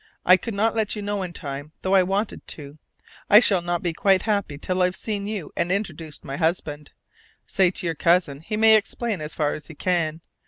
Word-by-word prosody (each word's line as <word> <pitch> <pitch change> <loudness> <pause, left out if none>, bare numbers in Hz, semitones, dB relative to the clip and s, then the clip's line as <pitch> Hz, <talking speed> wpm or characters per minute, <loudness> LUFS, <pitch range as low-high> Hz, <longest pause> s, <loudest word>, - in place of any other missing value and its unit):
I 185 - +8
could 205 +4 -5
not 220 +3 +1
let 220 -1 -1
you 210 - -5
know 205 0 -2
in 180 -2 -4
time, 145 -1 -7
though 190 - 0
I 195 - +6
wanted 195 +4 -2
to. 145 0 -11 0.5
I 210 - +9
shall 195 -6 +4
not 175 0 -2
be 175 -2 -1
quite 190 +3 +2
happy 200 -9 -1
till 185 +5 -2
I've 180 0 +2
seen 205 -1 -3
you 205 -8 -5
and 170 +1 0
introduced 165 -6 -4
my 135 +1 -5
husband. 155 -3 -2 0.6
Say 190 -2 +2
to 180 - -7
your 165 - 0
cousin 165 -3 +2
he 210 +6 -4
may 220 0 +7
explain 215 -2 -3
as 150 0 -6
far 150 -2 0
as 150 - -8
he 160 - -11
can. 165 -2 -1
180 Hz, 220 wpm, -23 LUFS, 155-205 Hz, 0.6 s, I